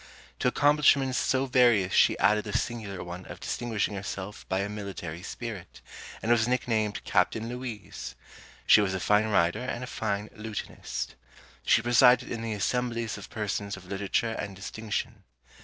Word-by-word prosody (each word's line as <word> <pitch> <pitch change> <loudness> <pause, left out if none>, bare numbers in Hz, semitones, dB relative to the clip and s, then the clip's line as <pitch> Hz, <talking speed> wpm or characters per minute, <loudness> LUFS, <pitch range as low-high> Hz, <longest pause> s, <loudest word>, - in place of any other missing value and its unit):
To - - +1
accomplishments 140 -1 +4
so 130 0 +1
various 120 -7 +4
she - - +5
added 105 0 +3
the 105 - 0
singular 110 -6 -4
one 90 +1 -7
of - - -9
distinguishing 115 -3 -2
herself 100 +1 -6
by 95 +1 +1
a 100 - -1
military 100 -5 -6
spirit, 105 - -7 0.4
and 115 - +1
was 115 -1 +4
nicknamed 110 -4 0
Captain 110 +4 +1
Louise. 120 - -6 0.5
She 105 - +7
was 95 -2 0
a - - -1
fine 105 +3 +3
rider 85 -5 +2
and 125 -1 -4
a - - -3
fine 105 -4 -3
lutanist. 110 -1 -5 0.5
She 115 - +4
presided 120 +1 +5
in 115 - -3
the 115 -1 -2
assemblies 115 +2 -1
of - - -10
persons 100 -2 -3
of 95 - -13
literature 100 +4 -1
and 100 -3 -5
distinction. 105 +3 -4
110 Hz, 155 wpm, -28 LUFS, 100-120 Hz, 0.5 s, She